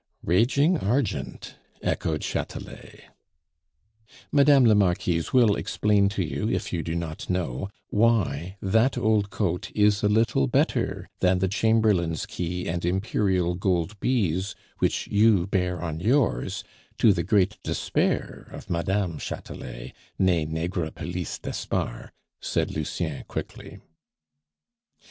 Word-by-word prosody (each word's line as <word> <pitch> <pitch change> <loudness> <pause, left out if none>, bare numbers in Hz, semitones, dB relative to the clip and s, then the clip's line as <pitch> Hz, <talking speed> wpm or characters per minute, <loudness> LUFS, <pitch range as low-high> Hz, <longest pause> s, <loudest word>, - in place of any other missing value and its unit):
"Raging 140 - +3
argent," 120 +5 -2 0.3
echoed 80 -2 -1
Chatelet. - - -6 1.3
"Madame 140 -2 +6
la 110 - +6
Marquise 90 -4 +1
will 120 -6 +5
explain 105 -2 +2
to 100 -1 -1
you, 80 - -2
if - - -2
you 85 - 0
do 80 +1 -3
not 85 -2 -5
know, 90 -1 -2 0.2
why 95 -6 +1
that 110 +7 +2
old 110 -4 +2
coat 90 -4 -2
is 105 -1 +3
a 105 - +2
little 110 - +2
better - - 0
than 90 0 +3
the 95 +1 +1
chamberlain's 105 -5 +2
key 90 +1 -4
and 85 +1 -2
Imperial 95 -1 +1
gold 90 +2 -1
bees 100 -7 0 0.2
which - - 0
you 105 -4 +4
bear 90 -2 -1
on 80 -2 -4
yours, 115 - +1 0.3
to 110 - +5
the 85 - -1
great 95 +2 +1
despair - - -1
of - - -9
Madame 90 -1 -1
Chatelet, - - -7 0.2
nee 85 -5 +2
Negrepelisse 85 +1 -3
d'Espard," - - -3 0.3
said - - -1
Lucien 75 -1 -3
quickly. - - -7
95 Hz, 120 wpm, -26 LUFS, 85-105 Hz, 1.3 s, Madame